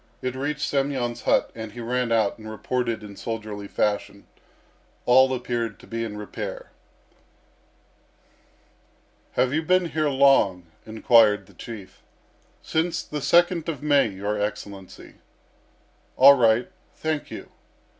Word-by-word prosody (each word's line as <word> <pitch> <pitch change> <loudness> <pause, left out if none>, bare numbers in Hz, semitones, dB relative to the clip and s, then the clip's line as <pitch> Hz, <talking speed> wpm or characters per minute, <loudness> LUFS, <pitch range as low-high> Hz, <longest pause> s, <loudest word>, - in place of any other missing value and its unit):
It 130 -1 -2
reached 145 +2 -2
Semyon's 135 -4 -1
hut, - - +2
and 110 -2 -8
he 120 - -9
ran 125 0 -1
out 110 -1 +1
and 110 0 -9
reported 115 +1 -2
in 100 -1 -10
soldierly 105 -2 -6
fashion. 100 -1 -2 0.8
All 130 +2 +5
appeared 120 -4 -3
to - - -15
be 115 0 -4
in 105 -2 -5
repair. 105 -1 -7 2.6
"Have 130 +1 +1
you 160 - +1
been 180 +1 +2
here 155 -2 0
long?" 130 -10 +3 0.2
inquired 110 -3 +4
the 100 - -20
Chief. 105 +1 -10 0.6
"Since 165 +2 -1
the 150 -1 -5
second 175 +1 +3
of 150 -4 -5
May, 145 -4 +4
your 105 +1 -3
Excellency." 100 -2 -6 1.0
"All 140 +2 +9
right. 120 +3 +2 0.2
Thank 155 -2 -3
you. - - -9
120 Hz, 125 wpm, -24 LUFS, 105-140 Hz, 2.6 s, All